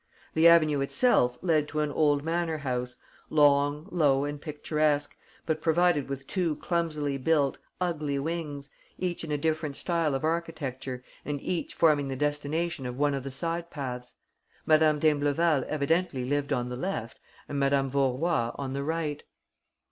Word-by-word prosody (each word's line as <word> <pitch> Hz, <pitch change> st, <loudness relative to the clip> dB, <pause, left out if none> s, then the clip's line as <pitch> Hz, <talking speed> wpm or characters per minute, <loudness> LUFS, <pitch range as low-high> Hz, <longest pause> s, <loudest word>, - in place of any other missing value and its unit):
The 160 Hz, +1 st, +6 dB
avenue 155 Hz, -4 st, +5 dB
itself 135 Hz, -, +3 dB
led 155 Hz, -4 st, +2 dB
to 155 Hz, 0 st, -2 dB
an 150 Hz, -1 st, -1 dB
old 145 Hz, -1 st, +2 dB
manor 165 Hz, 0 st, -1 dB
house, 125 Hz, -3 st, -3 dB, 0.3 s
long, 145 Hz, +1 st, +3 dB
low 145 Hz, -6 st, +3 dB
and 145 Hz, 0 st, -5 dB
picturesque, 150 Hz, -1 st, 0 dB, 0.3 s
but 155 Hz, -1 st, -1 dB
provided 165 Hz, -3 st, +2 dB
with 135 Hz, 0 st, -5 dB
two 175 Hz, -3 st, -1 dB
clumsily 155 Hz, -6 st, -1 dB
built, 145 Hz, -1 st, +1 dB, 0.2 s
ugly 155 Hz, -6 st, -1 dB
wings, 145 Hz, -2 st, -4 dB, 0.3 s
each 180 Hz, -2 st, -3 dB
in 160 Hz, -, -5 dB
a 150 Hz, -, +1 dB
different 155 Hz, -1 st, -1 dB
style 165 Hz, -4 st, 0 dB
of 135 Hz, -, -3 dB
architecture 140 Hz, -6 st, -3 dB, 0.2 s
and 145 Hz, -1 st, -3 dB
each 175 Hz, +4 st, -3 dB
forming 150 Hz, -4 st, +3 dB
the 135 Hz, -, -3 dB
destination 145 Hz, +1 st, -1 dB
of 125 Hz, 0 st, -6 dB
one 145 Hz, 0 st, +2 dB
of 135 Hz, -, -2 dB
the 135 Hz, -, -6 dB
side 165 Hz, +5 st, -2 dB
paths. 125 Hz, -5 st, -6 dB, 0.5 s
Madame 155 Hz, -1 st, +4 dB
d'Imbleval 145 Hz, 0 st, +2 dB
evidently 155 Hz, -2 st, 0 dB
lived 145 Hz, +1 st, -1 dB
on 125 Hz, 0 st, 0 dB
the 125 Hz, -, -4 dB
left 130 Hz, -7 st, -4 dB, 0.3 s
and 140 Hz, -, -3 dB
Madame 140 Hz, 0 st, +2 dB
Vaurois 135 Hz, -1 st, +1 dB
on 135 Hz, -1 st, -4 dB
the 140 Hz, 0 st, -2 dB
right. 155 Hz, -1 st, -2 dB
150 Hz, 155 wpm, -28 LUFS, 140-165 Hz, 0.5 s, The